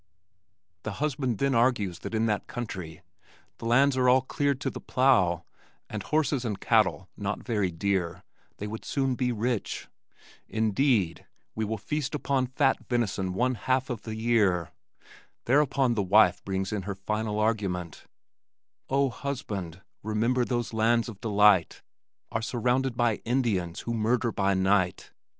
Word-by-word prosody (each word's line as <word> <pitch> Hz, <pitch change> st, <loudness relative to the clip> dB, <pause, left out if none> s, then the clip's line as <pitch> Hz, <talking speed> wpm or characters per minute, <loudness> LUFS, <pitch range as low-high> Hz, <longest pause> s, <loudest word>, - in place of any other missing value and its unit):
The 110 Hz, -, -4 dB
husband 135 Hz, -3 st, -1 dB
then 140 Hz, +3 st, +1 dB
argues 115 Hz, -7 st, +1 dB
that -, -, -5 dB
as -, -, +2 dB
in 110 Hz, -, +2 dB
that 105 Hz, -3 st, -1 dB
country 90 Hz, -8 st, -6 dB, 0.6 s
the -, -, -7 dB
lands 135 Hz, +4 st, +4 dB
are 125 Hz, -1 st, +3 dB
all 130 Hz, +1 st, +5 dB
cleared 140 Hz, 0 st, 0 dB
to 135 Hz, -, -1 dB
the -, -, -8 dB
plow, 95 Hz, -11 st, +2 dB, 0.5 s
and 110 Hz, -, -3 dB
horses 150 Hz, 0 st, 0 dB
and 105 Hz, -5 st, -3 dB
cattle 105 Hz, -4 st, +2 dB
not 100 Hz, 0 st, -3 dB
very 105 Hz, -6 st, 0 dB
dear, 90 Hz, 0 st, -2 dB, 0.3 s
they 105 Hz, -, -5 dB
would 110 Hz, +1 st, -6 dB
soon 135 Hz, -2 st, 0 dB
be 125 Hz, 0 st, 0 dB
rich. 120 Hz, 0 st, -2 dB, 0.6 s
Indeed, 110 Hz, -, +1 dB, 0.3 s
"we 110 Hz, -, -2 dB
will 110 Hz, +1 st, -2 dB
feast 150 Hz, +7 st, -3 dB
on 135 Hz, -2 st, +2 dB
fat 135 Hz, +1 st, +2 dB
venison 100 Hz, -6 st, -1 dB
one 125 Hz, +4 st, +2 dB
half 130 Hz, +2 st, 0 dB
of 115 Hz, -4 st, -4 dB
the 110 Hz, -1 st, -6 dB
year." 105 Hz, -8 st, +1 dB, 0.7 s
Thereupon 135 Hz, -1 st, +3 dB
the 110 Hz, -, 0 dB
wife 100 Hz, -1 st, +4 dB
brings 95 Hz, +1 st, -2 dB
in 105 Hz, -, -1 dB
her 100 Hz, -, -2 dB
final 105 Hz, +2 st, -2 dB
argument: 100 Hz, -7 st, -1 dB, 0.8 s
Oh, 140 Hz, 0 st, +2 dB
husband, 100 Hz, -, -5 dB, 0.2 s
remember 115 Hz, +4 st, +1 dB
those 120 Hz, -2 st, -2 dB
lands 115 Hz, +1 st, +2 dB
of 105 Hz, -3 st, -11 dB
delight 105 Hz, -5 st, +3 dB, 0.5 s
Are 115 Hz, -, -1 dB
surrounded 125 Hz, +2 st, 0 dB
by 120 Hz, -3 st, +2 dB
Indians 110 Hz, -9 st, -1 dB
who 115 Hz, -, -3 dB
murder 115 Hz, +2 st, +1 dB
by 100 Hz, -1 st, +1 dB
night. 95 Hz, -1 st, +1 dB
110 Hz, 150 wpm, -27 LUFS, 100-125 Hz, 0.8 s, all